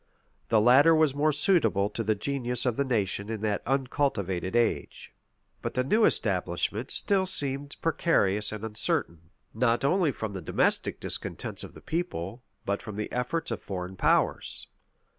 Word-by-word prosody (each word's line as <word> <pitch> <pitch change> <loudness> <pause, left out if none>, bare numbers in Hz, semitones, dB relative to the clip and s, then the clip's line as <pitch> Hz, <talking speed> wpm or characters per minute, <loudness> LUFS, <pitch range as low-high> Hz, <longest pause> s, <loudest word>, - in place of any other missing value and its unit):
The 110 - +4
latter 135 +9 +6
was 155 -3 +3
more 150 +2 +2
suitable 150 - +3
to 110 - -3
the 110 0 +1
genius 125 +1 -1
of 125 -3 +1
the 140 - +1
nation 105 -5 -1
in 110 -2 -4
that 105 -2 -1
uncultivated 125 - -1
age. 120 -1 -1 0.5
But - - -4
the 125 - +2
new 215 - +3
establishment - - 0
still 195 -2 +1
seemed 140 -3 -2
precarious 105 - +2
and 110 0 -6
uncertain; 85 -6 -2 0.2
not 115 +2 +1
only 170 +1 +3
from 110 -4 -5
the 95 - -5
domestic 80 - 0
discontents - - -3
of - - -10
the - - -12
people, 125 - -4 0.2
but 100 0 -1
from 105 - -8
the 105 0 -4
efforts 160 +7 -2
of - - -3
foreign 95 -1 -5
powers. - - +1
120 Hz, 160 wpm, -28 LUFS, 100-145 Hz, 0.5 s, latter